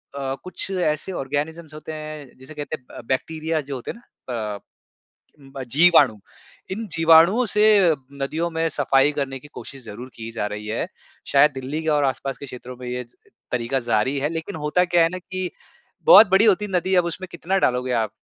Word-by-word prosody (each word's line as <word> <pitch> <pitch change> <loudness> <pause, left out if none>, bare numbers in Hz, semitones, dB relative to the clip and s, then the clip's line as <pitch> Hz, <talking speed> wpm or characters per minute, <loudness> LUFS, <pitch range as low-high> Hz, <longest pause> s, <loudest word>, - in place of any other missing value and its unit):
अ, 135 -1 -3
कुछ 185 +1 -6
ऐसे 175 -1 -1
ऑर्गैनिज़म्ज़ 150 +2 -4
होते 155 +1 -8
हैं, 155 -4 -8
जिसे 130 +4 -12
कहते 150 +1 -5
हैं - - -36 0.2
ब - - -24
बैक्टीरिया 160 +4 -1
जो 140 0 -6
होते 125 - -5
हैं - - -12
ना 130 - -10 0.2
अ, - - -9 0.8
ब 135 -1 -8
जीवाणु। 145 -7 +6 0.5
इन 220 +3 -3
जीवाणुओं 165 +9 +6
से 210 - +2 0.6
नदियों 160 +5 -1
में 165 0 0
सफ़ाई 140 0 +2
करने 135 -2 -3
की 150 - -14
कोशिश 135 -2 -9
ज़रूर 120 +5 -8
की 115 0 -7
जा 110 -2 -2
रही 105 +1 -6
है। 110 - -2 0.4
शायद 145 +2 +6
दिल्ली 135 +4 -4
के 160 - 0
और 150 -1 +2
आसपास 135 +1 -2
के 140 - -8
क्षेत्रों 125 0 -9
में 125 -1 -8
ये 125 0 -3 0.5
तरीका 125 +2 0
ज़ारी 120 +3 0
है। 145 +2 0
लेकिन 165 +3 -5
होता 180 +4 +3
क्या 175 -1 +3
है 165 - +3
ना 185 - -5
कि 185 0 -5 0.6
बहुत 225 - +10
बड़ी 195 +4 +5
होती 210 0 +3
है 200 - -8
नदी, 185 +2 0
अब 175 -1 +4
उसमें 180 +2 -5
कितना 185 +3 -1
डालोगे 125 -2 +1
आप? 110 -3 0
150 Hz, 195 wpm, -23 LUFS, 130-170 Hz, 0.8 s, बहुत